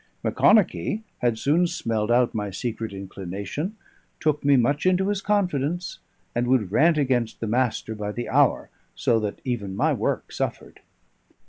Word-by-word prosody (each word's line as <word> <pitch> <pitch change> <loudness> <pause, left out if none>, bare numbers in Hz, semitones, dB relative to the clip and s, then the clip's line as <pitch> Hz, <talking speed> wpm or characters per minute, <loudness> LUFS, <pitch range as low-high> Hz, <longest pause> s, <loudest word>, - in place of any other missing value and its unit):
Macconochie 215 +1 +3 0.2
had 120 -2 +1
soon 160 +9 +2
smelled 115 -10 -2
out 120 0 +3
my 105 -2 -2
secret 115 +2 -4
inclination, 100 - -5 0.4
took 150 -1 0
me 140 -1 +5
much 140 +8 +2
into 185 +1 +2
his 205 -1 -1
confidence, 175 -5 -1 0.3
and 120 +1 0
would 120 -7 +2
rant 160 +8 +4
against 125 -5 0
the - - -3
Master 115 -1 0
by 105 -1 -4
the 120 +3 -5
hour, - - +2 0.2
so 115 - +2
that 105 -2 -4
even 105 -7 -3
my - - +2
work - - -2
suffered. - - -4
125 Hz, 150 wpm, -24 LUFS, 110-160 Hz, 0.4 s, me